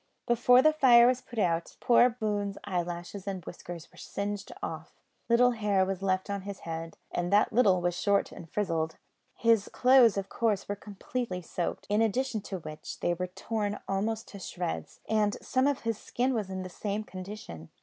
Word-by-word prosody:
Before 245 +2 +5
the 310 - +5
fire 245 -5 +7
was 250 0 +3
put 240 - -12
out, 170 -5 0
poor 245 +1 +5
Boone's 205 -4 -2
eyelashes 175 +1 -4
and 190 -4 -4
whiskers 175 -1 -8
were - - -16
singed 200 0 -4
off; - - -6 0.3
little 245 +1 +5
hair 205 -4 +2
was 190 -1 -3
left 190 -1 0
on 200 -1 -3
his 200 0 -7
head, 165 0 -6
and 175 +1 -2
that 205 +2 +4
little 200 -6 +4
was 175 0 +1
short 200 -1 +2
and 165 - -10
frizzled. 165 -6 -1 0.4
His 230 -3 +3
clothes, 250 -4 +6
of 195 -1 -2
course, 215 -2 0
were 205 - -2
completely 205 -1 -5
soaked; 175 +1 -3
in 210 +2 +2
addition 225 +1 0
to 190 - -3
which, 155 -3 -8
they 175 - +2
were 180 +1 -3
torn 210 +2 -3
almost 215 +3 -1
to 200 - -9
shreds, 180 -2 -5
and 210 -2 +1
some 260 +1 +1
of 285 -2 0
his 230 -2 -2
skin 255 +2 -1
was 215 -5 -2
in 190 -1 -4
the - - -5
same 205 +3 -3
condition. 185 - -8
205 Hz, 185 wpm, -29 LUFS, 185-230 Hz, 0.4 s, fire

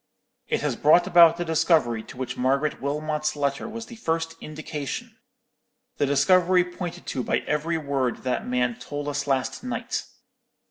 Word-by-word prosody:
It - - 0
has - - -1
brought 160 +4 +5
about 170 -2 +7
the 175 - -2
discovery 155 -8 +2
to - - -12
which 125 -1 -4
Margaret 135 +4 0
Wilmot's 150 +2 -1
letter 140 +7 -1
was 230 +1 -6
the 235 -1 -11
first 165 -4 -2
indication—the 150 -1 -7
discovery 180 +6 +4
pointed 180 -1 -7
to 130 - -2
by - - 0
every 160 +3 0
word 140 -5 -2
that 125 -1 -2
man 125 -1 0
told 145 +3 -5
us 145 0 -2
last 135 - -1
night. 250 -1 -3
150 Hz, 150 wpm, -25 LUFS, 135-170 Hz, -, about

